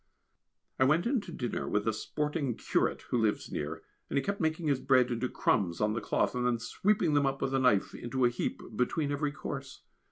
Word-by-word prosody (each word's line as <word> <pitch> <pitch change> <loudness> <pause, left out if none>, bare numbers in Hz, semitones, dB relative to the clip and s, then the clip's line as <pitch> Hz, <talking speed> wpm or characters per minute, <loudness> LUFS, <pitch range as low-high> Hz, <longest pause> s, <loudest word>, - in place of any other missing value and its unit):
I - - +6
went 155 +6 +3
in 245 -1 +1
to 180 - -9
dinner 125 -7 -3
with 105 +1 0
a 110 - +2
sporting 150 +3 -2
curate - - 0
who 120 - +2
lives 105 -2 0
near, 75 +2 -4 0.3
and - - -1
he 140 - +2
kept 200 -1 -2
making 160 +1 0
his 140 -3 +2
bread 130 -2 +3
into 120 +1 -1
crumbs 90 -6 +1
on 105 0 +2
the 115 - -2
cloth - - +1
and 125 0 -1
then 120 -1 +2
sweeping 175 - +1
them 145 -1 +3
up 135 0 -1
with 135 - -1
his 135 - +2
knife 125 -7 +3
into 125 +1 -1
a - - +5
heap, 120 - -3
between 140 +5 0
every 145 0 0
course. 140 -2 -7
130 Hz, 220 wpm, -31 LUFS, 120-150 Hz, 0.3 s, I